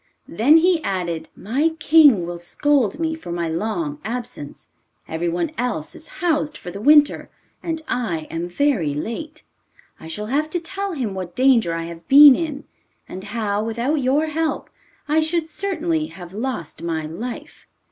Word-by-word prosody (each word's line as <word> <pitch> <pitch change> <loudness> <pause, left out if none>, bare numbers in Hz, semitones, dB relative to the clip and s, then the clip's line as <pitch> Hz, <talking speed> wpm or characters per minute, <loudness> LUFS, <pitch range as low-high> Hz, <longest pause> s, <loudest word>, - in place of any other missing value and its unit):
Then 255 - +5
he 340 -1 +3
added: 175 -4 -3
'My 290 +10 0
king 295 - +5
will 175 0 -6
scold 260 - +1
me 325 -1 0
for 320 - -8
my 170 -1 -2
long 225 - -3
absence, 220 -11 -6 0.4
everyone 170 +1 -2
else 235 -11 -2
is 320 - -10 0.2
housed 305 -2 +1
for 175 - -8
the 200 +3 -8
winter, 295 +3 +4 0.3
and 325 -1 -4
I 195 -10 -1
am 170 +2 -3
very 175 - +1
late. 300 - -6 0.6
I 160 - -10
shall 210 +6 -4
have 290 +7 0
to 350 - -1
tell 390 +3 -5
him 245 - -3
what 185 -2 -6
danger 240 -10 +3
I 165 - -3
have 165 0 -9
been 285 0 +10
in, 300 -2 -4 0.4
and 190 +1 -8
how, 210 -1 -2
without 240 +7 -1
your 275 +5 +2
help, 315 +1 -2 0.4
I 305 +1 +3
should 320 +1 0
certainly 330 -3 -2
have 175 - -11
lost 220 - -4
my 160 -2 -2
life. 215 +11 -7
250 Hz, 160 wpm, -21 LUFS, -, 0.6 s, been